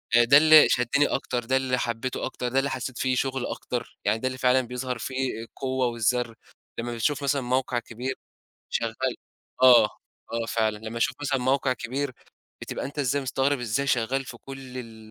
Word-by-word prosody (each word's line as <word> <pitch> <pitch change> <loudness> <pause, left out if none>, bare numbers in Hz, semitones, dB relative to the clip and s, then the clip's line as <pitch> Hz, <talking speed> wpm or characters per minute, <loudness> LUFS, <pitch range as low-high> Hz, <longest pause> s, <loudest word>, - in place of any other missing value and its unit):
آآ، 120 - +7
ده 125 +4 +7
اللي 155 0 +8
شدني 125 +4 +2
أكتر، 125 -3 -2
ده 130 +3 +2
اللي 130 -1 0
حبيته 120 +1 -2
أكتر، 125 -1 -4
ده 130 +2 +2
اللي 140 +1 0
حسّيت 130 -1 -4
فيه 130 0 +1
شغل 135 0 -1
أكتر، 120 -2 -5
يعني 110 +2 +2
ده 130 - -1
اللي 130 0 -4
فعلًا 130 0 +3
بيظهر 125 0 -4
فيه 130 -1 -3
القوة 130 +2 -2
والذر 120 0 0 0.4
لمّا 120 +1 -3
بتشوف 140 +5 0
مثلًا 140 0 +1
موقع 130 0 0
كبير 125 +3 -5 0.6
شغّال 120 +2 -1 0.5
آه، 125 -3 +9 0.5
آه 115 0 -1
فعلًا، 110 -2 0
لمّا 110 +2 -6
أشوف - - +1
مثلًا 140 -2 0
موقع 130 +1 +1
كبير 130 +3 -3 0.5
بتبقى - - -4
أنت 145 +2 -7
إزاي 140 0 +1
مستغرب 135 +2 0
إزاي 120 +4 -1
شغال 135 +1 +1
في 125 -2 -9
كلّ 135 -1 -9
ال 110 -3 -10
125 Hz, 185 wpm, -26 LUFS, 120-135 Hz, 0.6 s, آه